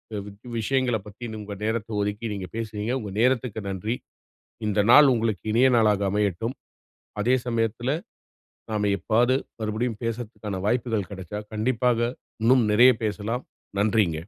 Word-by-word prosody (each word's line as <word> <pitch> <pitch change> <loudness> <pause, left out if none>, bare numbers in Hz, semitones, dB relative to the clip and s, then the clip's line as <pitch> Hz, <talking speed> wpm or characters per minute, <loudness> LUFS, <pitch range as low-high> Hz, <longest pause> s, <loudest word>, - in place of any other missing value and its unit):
அ - - -2
we - - -8 0.3
விஷயங்களப் 120 -3 0
பத்தி 115 +3 -8
உங்க 100 -1 -6
நேரத்த 110 0 -1
ஒதுக்கி 105 +3 -2
நீங்க 95 -2 -5
பேசுனீங்க. 110 +1 -3
உங்க 100 -2 -6
நேரத்துக்கு 125 -3 +1
நன்றி. 105 +5 -2 0.7
இந்த 105 0 +2
நாள் 145 -2 +9
உங்களுக்கு 110 -4 -1
இனிய 125 +3 +5
நாளாக 105 -3 +3
அமையட்டும். 105 +4 -1 0.7
அதே 125 +4 +3
சமயத்தில, 115 +2 0 0.8
நாம 105 -1 0
எப்பவாவது 120 +3 +2 0.3
மறுபடியும் 110 +1 -2
பேசுறதுக்கான 110 -4 -4
வாய்ப்புகள் 115 -4 0
கிடச்சால், 105 +2 -7
கண்டிப்பாக 120 +1 +1 0.4
இன்னும் 125 +1 +5
நிறைய 125 +4 +7
பேசலாம். 110 +4 -2 0.4
நன்றிங்க. 105 -5 +2
110 Hz, 130 wpm, -25 LUFS, 105-120 Hz, 0.8 s, நாள்